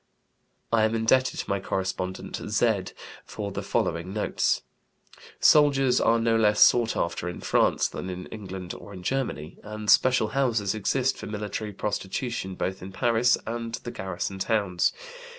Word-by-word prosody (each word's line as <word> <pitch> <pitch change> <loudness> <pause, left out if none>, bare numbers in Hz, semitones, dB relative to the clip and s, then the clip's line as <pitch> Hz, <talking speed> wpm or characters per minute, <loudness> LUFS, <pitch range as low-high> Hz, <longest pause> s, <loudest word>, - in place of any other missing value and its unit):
I 115 - +5
am 110 +1 0
indebted 130 +4 +2
to - - -11
my 100 0 0
correspondent 95 -1 -3
"Z" - - +1 0.4
for 100 -1 -6
the - - -4
following 85 +3 -1
notes: 105 +1 0 0.8
"Soldiers 135 -4 +5
are 115 - +4
no 115 0 +2
less 105 -1 +3
sought 120 -2 +5
after 85 +1 -2
in 90 - -7
France - - +2
than 95 - -6
in 90 0 -6
England 95 -4 -7
or 100 - -11
in 90 -2 -9
Germany, 105 - -3
and 105 0 -1
special 125 -4 +4
houses 115 -6 +1
exist 130 +5 0
for - - -7
military 105 0 -4
prostitution 100 0 -3
both 95 +1 -3
in 95 +2 -8
Paris 115 +4 +3
and 115 0 -4
the 120 +1 -7
garrison 95 0 -4
towns. 100 -3 +1
105 Hz, 150 wpm, -26 LUFS, 95-115 Hz, 0.8 s, I